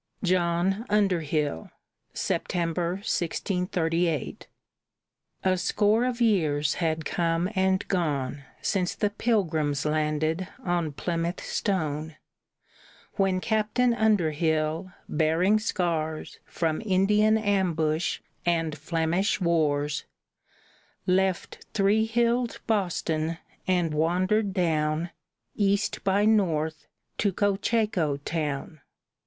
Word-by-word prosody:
JOHN 180 +2 +1
UNDERHILL 165 - 0 0.4
[September, 170 0 -1
1638] 170 -3 -1 1.0
A 185 -1 +2
score 215 +5 +2
of 250 -1 -2
years 155 -11 +2
had 160 -2 -1
come 165 +2 0
and 190 0 +1
gone 145 -6 -1 0.2
Since 185 -3 0
the 205 -1 0
Pilgrims 160 - 0
landed 155 +3 0 0.2
on 175 -3 0
Plymouth 170 +3 -2
stone, 155 -5 -2 1.0
When 190 -2 +2
Captain 220 +4 +1
Underhill, 165 -5 +1 0.2
bearing 165 +7 +2
scars 165 -7 -2
From 160 -2 -1
Indian 210 +2 +3
ambush 175 -6 0 0.2
and 165 -3 0
Flemish 165 +7 0
wars, 150 -4 +1 1.0
Left 190 0 0
three 210 +2 +3
hilled 235 +1 +1
Boston 165 -6 0 0.3
and 175 -4 +1
wandered 185 +7 +1
down, 160 -2 0 0.4
East 200 -1 0
by 200 +2 +2
north, 160 -8 +1 0.3
to 200 - +2
Cocheco 200 -5 +1
town. 150 0 -4
175 Hz, 90 wpm, -27 LUFS, 155-200 Hz, 1.0 s, Indian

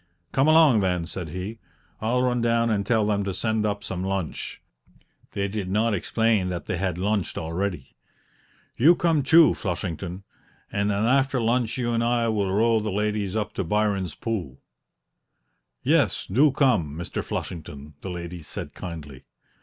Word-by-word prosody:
"Come 135 +2 +2
along, 155 -7 +6
then!" 90 -3 0
said 85 -1 -6
he; 95 +7 -6 0.4
"I'll 125 +3 +1
run 125 -1 +1
down 115 0 +2
and 100 -2 +1
tell 110 -3 +3
them 105 -1 +1
to 95 -2 -3
send 110 -1 0
up 100 0 -3
some 95 -3 -4
lunch" 95 -4 -3 0.7
(they 100 0 -1
did 100 -2 -4
not 110 +3 +2
explain 105 -1 +1
that 90 -1 -4
they - - -2
had 90 -1 -1
lunched 100 +1 -1
already). 90 -2 -3 0.8
"You 160 +8 +6
come, 165 -4 +2
too, 160 +4 +6
Flushington, 90 0 -4 0.5
and 100 0 0
then 105 +1 +1
after 135 +1 +2
lunch 120 +1 +1
you 120 -2 -1
and 115 0 +1
I 120 -1 +1
will 100 -3 0
row 110 +3 +3
the 110 0 -3
ladies 105 -1 -1
up 105 -1 -2
to 95 - -2
Byron's 100 -2 0
Pool?" 95 - -4 1.2
"Yes, - - +2
do 135 +9 +4
come, 115 - +2
Mr. 85 +2 -4
Flushington," 75 -3 -6
the 95 - -6
ladies 85 -2 -7
said - - -6
kindly. 75 -7 -8
105 Hz, 160 wpm, -25 LUFS, 90-115 Hz, 1.2 s, along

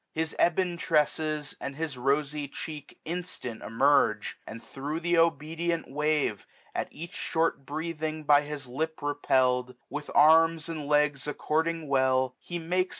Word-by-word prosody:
His 160 0 -2
ebon 175 0 +1
tresses, 155 -2 0
and 140 - -4
his 155 -2 -3
rosy 140 +3 0
cheek 150 +1 -7
Instant 170 -9 -5
emerge; 125 -2 +2
and 115 +1 -8
thro' 145 +3 -5
the 175 0 +2
obedient 165 +1 0
wave, 150 -6 0 0.3
1250 - - 0
At - - -6
each 170 +2 -8
short 160 -4 -1
breathing 155 0 -3
by 145 -1 +6
his 150 -1 -6
lip 155 +6 -3
repellM, 130 -3 +1 0.2
With 145 0 -5
arms 165 +1 +6
and 155 -3 -4
legs 150 -1 +2
according 160 +2 -1
well, 130 -2 +2
he 175 - -5
makes. 180 +3 0
150 Hz, 145 wpm, -28 LUFS, 140-165 Hz, 0.3 s, by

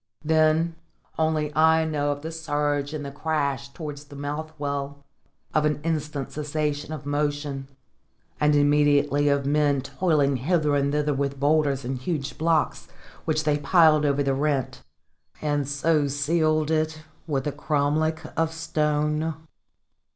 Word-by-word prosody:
Then 160 +1 +2 0.4
only 155 -2 0
I 160 +1 +4
know 145 -2 0
of 145 0 -5
the 160 - -4
surge 145 -3 -1
and 150 -2 -5
the 140 - -5
crash 140 -2 -2
towards 150 -1 -7
the 145 - -13
well 150 +3 -5
mouth, 140 -1 -4 0.5
of 155 - +3
an 150 0 +1
instant 150 -4 -2
cessation 150 0 -2
of 150 -3 -6
motion, 145 -1 -2 0.7
and 150 0 +3
immediately 145 0 +3
of 140 -1 +1
men 145 -1 +2
toiling 145 -2 +1
hither 150 +2 +1
and 140 0 +1
thither 150 0 +1
with 140 0 -2
boulders 145 -2 +2
and 130 +1 -3
huge 140 -1 -3
blocks, 160 -2 +1 0.4
which 155 -1 0
they 150 -1 +1
piled 155 -1 +5
over 145 -1 +2
the 135 -1 +1
rent, 135 - -1 0.6
and 145 -2 -1
so 145 +1 +2
sealed 155 +2 +1
it 155 0 -1 0.2
with 135 -4 -1
a 145 - 0
cromlech 150 +2 0
of 165 0 +1
stone. 150 -1 0
150 Hz, 145 wpm, -25 LUFS, 145-155 Hz, 0.7 s, piled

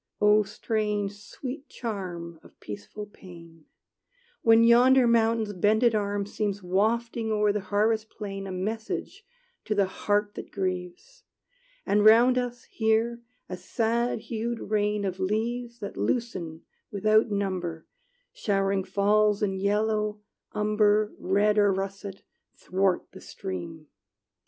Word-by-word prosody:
O 210 +1 +5
strange, 210 0 -2
sweet 260 +7 -8
charm 175 -7 -6
Of - - -20
peaceful 105 - -8
pain, 170 -5 -15 0.8
When 225 0 +6
yonder 250 +2 +6
mountain's 225 -2 +2
bended 215 +5 +3
arm 205 -1 -1
Seems 205 -1 -3
wafting 220 +4 0
o'er 210 -1 +2
the 210 - -1
harvest 215 +3 0
plain 195 -2 -6
A - - -5
message 215 +4 -4 0.4
to 215 - -1
the 200 -1 +3
heart 205 +2 -1
that - - -8
grieves, 185 - -5 0.6
And 205 +1 +2
round 240 +4 +6
us, 245 -1 -4
here, 225 +1 0 0.3
a 185 - -5
sad 230 +5 -1
hued 230 -1 -4
rain 210 -1 +1
Of 190 -1 -3
leaves 235 +5 -2
that 200 - -6
loosen 180 -10 -2 0.3
without 215 +2 +3
number 185 -5 -3 0.5
Showering 195 -1 0
falls 210 +2 +2
in 195 -2 +1
yellow, 210 +2 0 0.3
umber, 210 0 +2
Red, 205 +3 +2
or 205 -1 +4
russet, 195 0 -5 0.3
'thwart 190 -1 0
the - - -12
stream! 125 - -7
210 Hz, 125 wpm, -27 LUFS, 195-220 Hz, 0.8 s, When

